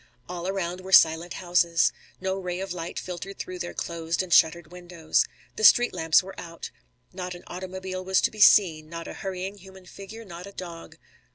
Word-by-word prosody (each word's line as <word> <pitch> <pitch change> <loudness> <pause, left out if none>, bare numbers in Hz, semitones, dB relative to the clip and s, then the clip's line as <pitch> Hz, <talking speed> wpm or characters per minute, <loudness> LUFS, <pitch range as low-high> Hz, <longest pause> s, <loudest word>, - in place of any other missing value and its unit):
All 180 0 -5
around 185 -2 -3
were 190 +1 -9
silent 165 0 +5
houses. 175 -2 +2 0.3
No 190 +1 -2
ray 180 -1 -4
of 195 -1 -4
light 170 -1 -6
filtered 185 +2 -6
through 185 0 -6
their 175 0 -5
closed 170 +1 -2
and 180 -2 -2
shuttered 160 0 +4
windows. 175 -3 0 0.3
The - - -4
street 240 +3 +7
lamps 160 +2 +3
were 190 +1 -9
out. 170 -1 -8 0.4
Not 180 -1 -5
an 175 - -12
automobile 185 +1 -6
was 190 0 +2
to - - +1
be 215 - -12
seen, 165 -7 +5
not 165 0 -7
a - - -7
hurrying 190 +1 -5
human 190 0 -14
figure, 205 +5 -10
not 175 0 -9
a 200 - -11
dog. 170 -3 -9
180 Hz, 190 wpm, -26 LUFS, 170-190 Hz, 0.4 s, street